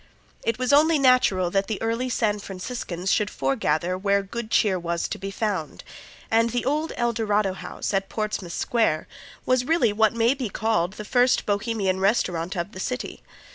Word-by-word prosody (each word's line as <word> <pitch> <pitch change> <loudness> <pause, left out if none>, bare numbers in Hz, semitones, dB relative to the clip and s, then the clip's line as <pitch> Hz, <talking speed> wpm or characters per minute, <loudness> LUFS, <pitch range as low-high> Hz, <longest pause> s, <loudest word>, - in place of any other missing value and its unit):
It 230 - 0
was 255 +2 +1
only 310 +2 +5
natural 250 -10 +3
that 195 +1 +1
the 220 - -3
early 230 +3 -1
San 215 -3 0
Franciscans 190 -2 -4
should 210 -1 +2
foregather 150 +6 0
where 200 0 +2
good 220 +3 -6
cheer 195 -4 +2
was 170 0 -2
to - - -5
be 195 +1 -5
found, 195 -5 -3 0.5
and 230 +1 +3
the 240 +1 -2
old 305 +4 0
El 240 -1 +1
Dorado 210 -3 +1
House, 180 +2 -5
at 195 0 0
Portsmouth 210 -5 -3
Square, 220 -10 0 0.4
was 255 -1 +2
really 265 -8 +2
what 220 0 +3
may 230 +2 +3
be 260 -5 -4
called 190 -4 0
the 210 0 -8
first 245 +3 +3
Bohemian 205 -2 0
restaurant 185 -3 0
of 170 +4 -3
the 185 - -9
city. 250 +6 -4
210 Hz, 175 wpm, -24 LUFS, 185-235 Hz, 0.5 s, only